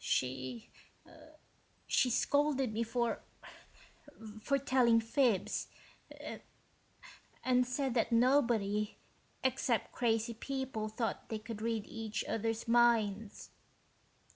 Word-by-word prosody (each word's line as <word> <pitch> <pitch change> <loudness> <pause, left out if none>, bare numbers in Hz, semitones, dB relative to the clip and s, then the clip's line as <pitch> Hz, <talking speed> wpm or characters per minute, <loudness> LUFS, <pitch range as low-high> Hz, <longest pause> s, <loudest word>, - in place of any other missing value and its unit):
She... 130 -2 -2 1.1
she 255 - +3
scolded 275 -1 +1
me 225 - -1
for... 235 +1 -1 1.2
for 275 +5 +1
telling 255 -4 +4
fibs... 230 -2 +1 1.8
and 250 -1 +3
said 260 0 -1
that 235 0 +1
nobody 230 -4 +2 0.5
except 260 -2 0
crazy 230 -1 0
people 260 -2 -4
thought 225 +1 -3
they 220 - -2
could 215 0 -7
read 225 -2 -1
each 220 -1 -4
other's 225 +1 -2
minds." 225 -3 +2
230 Hz, 90 wpm, -34 LUFS, 220-255 Hz, 1.8 s, telling